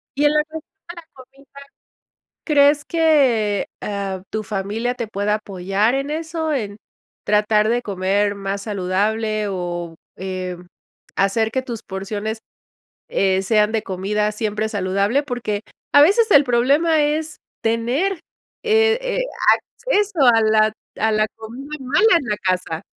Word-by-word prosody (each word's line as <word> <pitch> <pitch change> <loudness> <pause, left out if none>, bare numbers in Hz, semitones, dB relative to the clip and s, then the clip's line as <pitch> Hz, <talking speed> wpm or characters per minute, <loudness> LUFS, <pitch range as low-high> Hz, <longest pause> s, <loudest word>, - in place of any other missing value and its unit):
Y 290 +2 +1
en 295 - +4
la 300 0 +3
cuestión 315 +1 -8 0.3
de 345 - -7
la 340 - -10
comida, 270 +1 -18 1.0
¿crees 290 -1 +4
que, 265 - +2
ah, 195 -2 -4
tu 215 - -3
familia 215 +4 -3
te 235 -2 -4
pueda 205 0 -1
apoyar 200 +2 -1
en 275 +2 -2
eso 320 0 -3
en 210 -8 -3 0.5
tratar 210 +1 +2
de 240 +2 +1
comer 200 0 0
más 195 0 -4
saludable 210 +2 -1
o, 175 -3 -4 0.2
em, 185 -1 -6 0.5
hacer 220 +3 +1
que 260 +3 -1
tus 235 -4 -6
porciones, 205 +3 -5 0.7
eh, 190 -1 +1
sean 210 +1 +2
de 220 -1 -1
comida 210 +3 -1
siempre 215 0 -2
saludable?, 200 +7 0
porque 240 -6 -3 0.3
a 285 - +8
veces 420 +9 +4
el 285 - +7
problema 285 +6 +3
es 305 +1 -1 0.2
tener, 240 +12 0 0.5
eh 445 0 +3
eh, - - -1 0.7
acceso 410 -5 +1
a 225 - +4
la 215 0 +3 0.3
a 220 0 +2
la 215 0 +2
comida 250 +7 -8
mala 300 - +4
en 280 - -7
la 210 -1 -1
casa. 180 -3 -2
220 Hz, 140 wpm, -20 LUFS, 200-285 Hz, 1.0 s, a